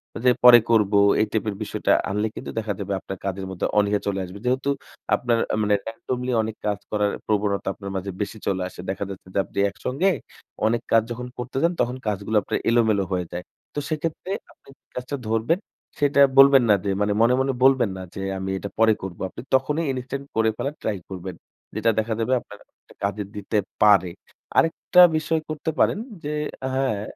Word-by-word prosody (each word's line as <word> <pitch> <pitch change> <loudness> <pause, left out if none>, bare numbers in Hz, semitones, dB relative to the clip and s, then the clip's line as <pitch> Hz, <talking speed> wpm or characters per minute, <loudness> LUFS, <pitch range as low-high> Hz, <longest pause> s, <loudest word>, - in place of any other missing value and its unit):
আ - - -3
যে 125 - +7
পরে 120 -1 +10
করব। 105 -2 +3 0.3
এই - - +3
টাইপের 105 -2 -1
বিষয়টা - - -1 0.2
আনলে 105 +2 0
কিন্তু - - -6
দেখা 105 -2 -2
যাবে 100 0 -3
আপনার 95 - -7
কাজের 95 0 -3
মধ্যে 95 - -3
অনীহা 105 0 +2
চলে 100 -1 -1
আসবে। 90 +3 -10
যেহেতু 130 +3 +1 0.5
আপনার 120 -2 +1 0.2
আ - - +2
মানে 105 0 +3
randomly 125 +2 -3
অনেক 110 0 -4
কাজ 105 -1 0
করার 105 -1 +1 0.2
প্রবণতা 100 -2 0
আপনার 100 -1 -8
মাঝে 95 +1 -3
বেশি 105 +2 -3
চলে 95 -2 0
আসে। - - -16
দেখা 95 - -2
যাচ্ছে 95 -1 -9
যে - - +1
আপনি - - -16
একসঙ্গে 130 - 0 0.6
অনেক 120 +1 +1
কাজ 115 - +6
যখন 125 +1 -5
করতে 125 +2 -5
যান। 170 +1 +3
তখন 125 +1 0
কাজগুলো 105 +1 0
আপনার - - -2
এলোমেলো 110 -4 +3
হয়ে 90 -1 0
যায়। 90 +1 -5 0.3
তো 145 - -2
সেক্ষেত্রে 160 +4 -3 0.2
আপনি - - -27
যে - - -74
কাজটা 125 +3 -4
ধরবেন, 115 - +1 0.4
সেটা 140 -1 +3 0.2
বলবেন 135 -1 +8
না 105 - +7
যে - - 0
মানে 105 0 +2
মনে, 120 +2 +5
মনে 135 0 +1
বলবেন 130 -4 +5
না - - -6
যে 95 - -5 0.2
"আমি 95 0 -4
এটা 100 - -5
পরে 110 -1 +6
করব।" 95 -2 -6
আপনি - - -9
তখনই 150 +5 +1
ইনস্টান্ট 130 +2 -5
করে 110 0 +3
ফেলার 140 +2 -3
ট্রাই 105 -3 -1
করবেন। 95 -1 -6 0.4
যেটা 110 +1 +2
দেখা 110 +1 -1
দেবে 125 +3 +1
আপনার 105 - -13 0.2
একটা - - -21
কাজে 100 +1 -1
দিতে 105 +1 -2 0.3
পারে। 100 -4 +6 0.5
আরেকটা 165 +2 +4 0.2
বিষয় 160 +1 0
করতে 155 +1 -3
পারেন - - +3 0.3
যে 150 +1 -3 0.4
হ্যাঁ, 130 -6 0
110 Hz, 195 wpm, -24 LUFS, 100-130 Hz, 0.6 s, পরে